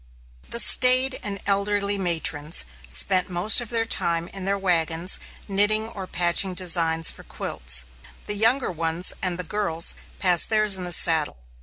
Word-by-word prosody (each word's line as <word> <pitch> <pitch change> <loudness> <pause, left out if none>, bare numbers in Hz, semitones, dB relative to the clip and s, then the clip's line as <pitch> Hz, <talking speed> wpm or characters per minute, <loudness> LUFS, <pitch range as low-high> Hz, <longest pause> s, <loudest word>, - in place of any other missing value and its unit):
The 235 - -3
staid 255 +2 +5
and 200 -1 -4
elderly 200 0 -1
matrons 165 - -1 0.2
spent 70 - +2
most 185 +7 +2
of 235 - -9
their 230 -1 0
time 170 -6 -2
in 195 -1 -7
their 200 +1 -1
wagons, 170 -2 0 0.3
knitting 205 +2 0
or 195 -4 -9
patching 180 +2 0
designs 165 -3 +1
for - - -14
quilts. 65 0 0 0.4
The - - -2
younger 230 +5 +1
ones 165 +1 0
and 180 -2 0
the 180 - -5
girls 170 -3 0 0.2
passed 180 -3 +3
theirs 215 -2 +1
in 185 -1 -3
the 175 - -6
saddle. 160 - +2
185 Hz, 155 wpm, -23 LUFS, 165-205 Hz, 0.4 s, staid